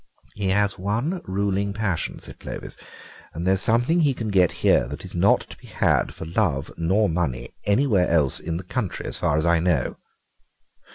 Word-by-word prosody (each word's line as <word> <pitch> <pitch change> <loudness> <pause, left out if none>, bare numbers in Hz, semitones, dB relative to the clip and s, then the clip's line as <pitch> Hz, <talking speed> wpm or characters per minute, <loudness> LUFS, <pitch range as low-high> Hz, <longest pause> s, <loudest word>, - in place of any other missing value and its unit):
"He 100 -2 -3
has 100 0 +1
one 115 - -1
ruling 100 +1 -1
passion," 100 -5 -2
said - - -10
Clovis, - - -7 0.6
"and 85 +2 -4
there's 95 0 +3
something 120 +11 +2
he 145 -5 +2
can 110 -3 -4
get 95 -4 +4
here - - +4
that 75 +7 -7
is 90 - -9
not 90 +4 +4
to - - -12
be - - -15
had - - +1
for - - -8
love 80 -6 0
nor 95 +6 +2
for 80 - -2
money 80 -8 -2
anywhere 105 -3 +3
else 75 -6 +2
in 85 0 -3
the 90 - -6
country, 100 +1 -3
as - - -3
far 70 - +1
as 80 - 0
I 85 0 +4
know." 90 -1 0
95 Hz, 190 wpm, -24 LUFS, 85-105 Hz, 0.6 s, get